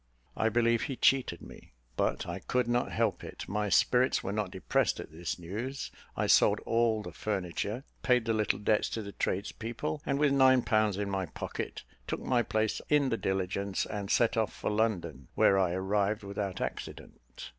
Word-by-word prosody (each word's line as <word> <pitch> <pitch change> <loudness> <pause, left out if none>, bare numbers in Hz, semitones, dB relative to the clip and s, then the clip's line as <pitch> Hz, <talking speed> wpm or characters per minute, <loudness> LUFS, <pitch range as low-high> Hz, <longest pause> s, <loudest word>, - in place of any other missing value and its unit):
"I 110 - +2
believe 115 0 +2
he 135 - -3
cheated 125 -10 +2
me, - - -13 0.2
but - - 0
I - - -4
could 125 -1 0
not 120 0 0
help 110 -4 0
it. - - -8
My 105 +1 -1
spirits 125 +9 +3
were 95 - -2
not 105 0 -1
depressed - - 0
at - - -8
this 80 +2 -4
news; 110 +11 -5 0.3
I - - +1
sold - - +5
all 115 -2 +1
the - - -7
furniture; 105 +4 -3 0.2
paid 125 -3 +3
the 115 - +1
little 110 -1 +1
debts 105 +1 +1
to 110 - -3
the 100 - -7
tradespeople, 115 +9 -3
and, 140 - 0
with 145 -1 +3
nine 130 -2 +5
pounds 110 -4 +2
in 100 -1 -2
my 95 -2 -1
pocket, - - -5 0.2
took - - -3
my 125 -2 +2
place 110 -2 -1
in 145 -3 +4
the 115 - +1
diligence, 95 0 -1
and 100 -2 -5
set 115 +1 +3
off 110 -1 +1
for - - -3
London, 85 - -1
where 95 - +5
I 90 -2 +2
arrived 100 +3 0
without 100 -1 -4
accident. - - -6
110 Hz, 185 wpm, -30 LUFS, 95-120 Hz, 0.3 s, sold